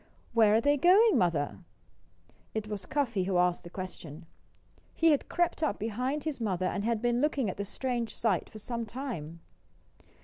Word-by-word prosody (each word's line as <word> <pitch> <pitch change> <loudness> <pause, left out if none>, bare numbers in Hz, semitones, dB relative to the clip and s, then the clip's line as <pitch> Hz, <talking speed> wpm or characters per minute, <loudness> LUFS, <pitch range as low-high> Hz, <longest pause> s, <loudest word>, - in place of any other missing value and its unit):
"Where 220 -2 +5
are 225 - +4
they 290 +3 +3
going, 385 - +6
Mother?" 145 - 0 1.0
It 215 -1 -2
was 205 -2 -5
Cuffy 240 -10 0
who 190 -1 0
asked 180 0 +2
the 175 - -9
question. 175 -3 -8 0.7
He 330 0 +4
had 290 - 0
crept 345 -1 0
up 310 - 0
behind 250 +7 -2
his 300 -6 -4
mother 185 -4 -1
and 200 +2 -1
had 230 0 -1
been 240 0 +2
looking 280 -8 +1
at - - -11
the 200 - -3
strange 240 +1 -3
sight 205 -7 0
for 220 - -11
some 235 +2 -4
time. 210 - -6
225 Hz, 175 wpm, -30 LUFS, 185-270 Hz, 1.0 s, going